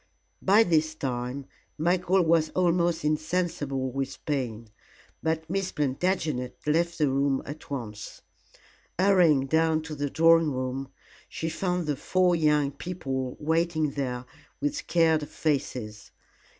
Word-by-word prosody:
By 205 +4 +5
this 155 -4 +1
time 130 -1 -3 0.3
Michael 180 +3 +2
was 160 -1 +3
almost 175 -3 +2
insensible 150 -4 -1
with 135 +1 -5
pain, 120 -6 -3 0.5
but 160 0 -1
Miss 190 +2 -2
Plantagenet 145 -3 -1
left 170 +3 +1
the 150 - +2
room 135 0 +1
at 150 +2 -9
once. 110 -7 -6 0.7
Hurrying 175 -7 +4
down 160 +2 +2
to 160 -1 -7
the 145 -1 -2
drawing 165 0 +4
room, 130 +1 -3 0.4
she 160 - -3
found 180 0 -1
the 150 -1 0
four 180 +5 +2
young 150 -3 +2
people 135 -5 -4
waiting 160 -1 +1
there 130 -3 -3 0.3
with 290 0 -1
scared 160 - +1
faces. 125 -8 -3
155 Hz, 125 wpm, -27 LUFS, 135-170 Hz, 0.7 s, By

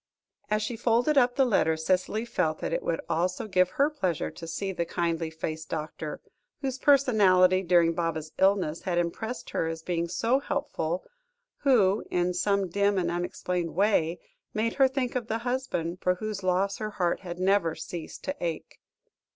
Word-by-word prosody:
As 215 0 +1
she 235 +2 -3
folded 240 +5 +2
up 245 -2 +4
the 270 - +4
letter, 160 -9 +2
Cicely 185 +7 0
felt 160 -9 0
that - - -3
it - - 0
would 165 - -1
also 180 +5 -1
give 185 -2 +3
her 280 - +3
pleasure 185 - -1
to 165 - -9
see 195 +4 -3
the 175 -2 -1
kindly 165 -1 -1
faced 160 -1 -5
doctor, 155 -1 -5 0.4
whose 265 -2 -3
personality 195 -10 +5
during 170 -2 +4
Baba's 160 -2 -2
illness, 190 -5 +2
had 180 -2 -1
impressed 220 +8 -3
her 160 - 0
as 165 0 -5
being 170 -1 -1
so 230 +9 +1
helpful, 185 - -2 0.5
who, 220 -8 +3
in 180 0 +1
some 200 +1 +1
dim 200 +3 +1
and 175 -2 0
unexplained 175 -1 -3
way, 180 -4 +2 0.4
made 225 +1 0
her 270 -1 +5
think 260 -2 -2
of 240 -3 -2
the 225 - -1
husband, 245 -10 -2
for 180 0 +2
whose 210 +1 -4
loss 190 +2 +1
her 215 -1 -3
heart 180 -5 0
had 175 -2 -7
never 185 -3 +2
ceased 170 -3 -7
to 280 +1 -3
ache. 165 -2 -4
185 Hz, 175 wpm, -28 LUFS, 170-220 Hz, 0.5 s, personality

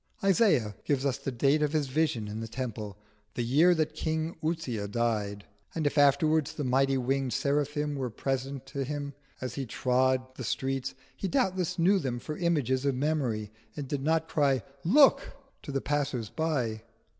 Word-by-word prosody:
Isaiah 190 - +3
gives 140 -2 0
us 135 -2 0
the 135 - -3
date 140 +5 +2
of 150 0 +1
his 155 -2 +2
vision 130 -6 0
in 105 +1 -5
the 115 - -4
Temple 110 -4 -5 0.4
"the 120 - -1
year 155 +9 +5
that 155 -1 0
King 160 +1 -2
Uzziah 145 -11 -2
died" 105 -2 -1 0.3
and 160 -2 -1
if 145 - +1
afterwards 155 +1 +3
the 150 - -4
mighty 135 +1 +2
winged 130 0 0
seraphim 145 +2 0
were 130 -3 -2
present 135 +3 -3
with 135 -2 -2
him 145 -1 -4 0.3
as 130 -2 -4
he 135 0 -4
trod 130 +2 +1
the 130 - -5
street, 135 +2 -2 0.2
he 195 - -3
doubtless 185 - 0
knew 190 +4 +4
them 130 -7 -2
for 150 +5 -5
images 145 -7 +1
of 140 -2 +1
memory, 125 -7 -1 0.3
and 145 -2 -4
did 140 0 -2
not 160 +2 +1
cry 140 -6 +2 0.2
"Look!" 275 - +5 0.3
to - - -7
the 135 -1 -1
passers 140 -6 -1
by. 130 -9 -1
135 Hz, 175 wpm, -29 LUFS, 125-155 Hz, 0.4 s, year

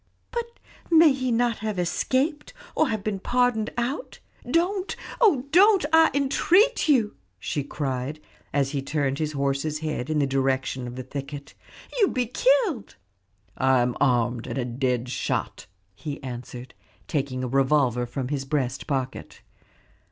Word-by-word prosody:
"But 470 0 -4 0.3
may 325 -3 +7
he 255 -2 -2
not 235 0 +1
have 215 -3 -3
escaped, 265 - -1 0.2
or 310 - +2
have 215 -3 -2
been 205 -2 -2
pardoned 245 0 +1
out? 260 - -3 0.3
Don't, 365 +6 0 0.3
oh 305 - +4
don't, 390 0 +6
I 320 0 +7
entreat 350 - +3
you!" 235 -8 +3 0.2
she 140 +9 -3
cried, 135 +1 -3 0.3
as 140 -1 +1
he 140 -2 -2
turned 140 -1 -1
his 155 -1 -2
horse's 140 +2 -1
head 155 -5 -3
in 155 - 0
the 145 - +3
direction 135 -1 -1
of 120 - -7
the 130 - -5
thicket. 140 +2 -7 0.5
"You 410 - +5
will - - -5
be 250 -1 +1
killed." 410 - +1 0.6
"I 130 -1 +3
am 120 0 -1
armed, 120 -2 +1
and - - -4
a 125 - -1
dead 125 0 -1
shot," 125 - -3 0.3
he 145 +9 -6
answered, 125 0 -7 0.3
taking 135 -4 -2
a - - -1
revolver 130 -2 +2
from 125 +1 -4
his 140 -2 -2
breast 135 -2 -2
pocket. 130 -3 -4
150 Hz, 150 wpm, -25 LUFS, -, 0.6 s, may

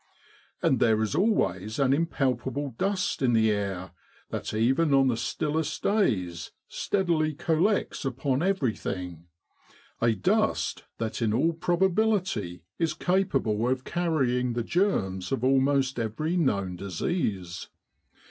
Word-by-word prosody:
And - - +3
there 110 -1 +3
is 105 - -2
always 110 - +1
an 135 -2 +3
impalpable 135 -3 -1
dust 190 -5 0
in 125 -3 +3
the 110 -1 +4
air 95 -3 -3 0.4
that - - -4
even 135 +7 +2
on 135 -1 +4
the 120 - +1
stillest 155 +6 -2
days 100 - 0 0.2
steadily 165 -6 0
collects 170 +8 0
upon 135 +1 -1
everything 100 - -2 0.7
a 115 -1 +4
dust 95 - 0
that 115 +1 -3
in 110 -2 +1
all 160 +9 +2
probability 175 - 0 0.2
is 165 -2 0
capable 135 - +1
of 130 0 -1
carrying 130 -8 0
the 120 0 -1
germs 110 - 0
of 135 -3 -1
almost 135 0 +2
every 115 +10 -2
known 100 - 0
disease. 95 - -3
130 Hz, 120 wpm, -27 LUFS, 110-165 Hz, 0.7 s, the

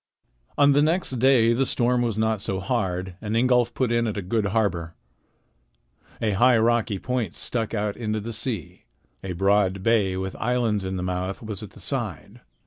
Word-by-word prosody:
On 145 0 +6
the 140 +1 +4
next 155 -5 +1
day 120 -3 +5
the 130 +3 +1
storm 125 -1 +1
was 115 -3 -1
not 110 -2 0
so 95 -3 -2
hard, 95 -4 -2
and 105 0 -3
Ingolf 125 0 +3
put 130 -3 0
in 115 0 +1
at 105 - -3
a 100 - -3
good 105 +3 0
harbor. 90 -6 -1 1.2
A 110 - 0
high 120 +5 +4
rocky 115 -2 +1
point 120 -3 -3
stuck 115 -2 -3
out 105 -1 -1
into 110 -2 -2
the 115 +3 -5
sea. 110 - -4 0.4
A 95 -1 -4
broad 95 0 +1
bay 105 -5 +2
with 95 0 -4
islands 115 -4 0
in 95 0 -3
the 90 - -3
mouth 90 +3 -3
was 105 -3 -5
at 100 -4 -10
the - - -14
side. - - -4
110 Hz, 185 wpm, -24 LUFS, 95-120 Hz, 1.2 s, On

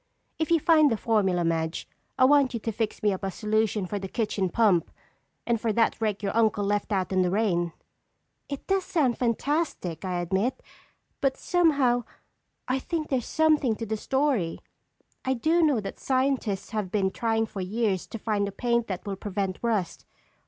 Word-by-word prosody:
If 320 - 0
you 335 -1 +4
find 310 -2 +5
the 225 - +1
formula, 195 -7 +1
Madge, 160 0 -1 0.3
I 255 - +6
want 275 -2 +4
you - - -2
to 225 - -2
fix 220 +1 -3
me 205 -2 +3
up 190 - -6
a 195 - 0
solution 215 0 0
for 205 +3 -3
the 195 - -5
kitchen 205 -3 -1
pump! 190 -4 +3 0.6
And 235 -2 0
for 225 - +1
that 230 +1 +1
rake 210 -2 -1
your 200 - -2
uncle 220 -2 +2
left 205 +2 -1
out 190 -2 0
in 190 -1 +2
the 180 - +2
rain!" 180 -4 +1 0.8
"It 280 -1 -5
does 390 -1 +1
sound 275 -9 0
fantastic, 240 - -1
I 180 -2 -2
admit, 190 +8 -1 0.6
but 270 -1 +1
somehow, 285 -9 +2 0.6
I 255 +1 +1
think 310 +2 -3
there's 255 -4 -1
something 305 -7 +2
to 225 - -5
the 220 0 -2
story. 260 - 0 0.7
I 260 0 0
do 320 +8 +2
know 295 -7 +3
that 200 - -6
scientists 260 -7 0
have 210 -4 -2
been 190 -1 +1
trying 225 0 0
for 205 -3 -6
years 195 0 -1
to - - -6
find 210 -2 -1
a - - -4
paint 235 +3 0
that 185 -2 -5
will 200 -1 -3
prevent 195 -2 -3
rust. 215 -7 -2
220 Hz, 185 wpm, -27 LUFS, 195-260 Hz, 0.8 s, I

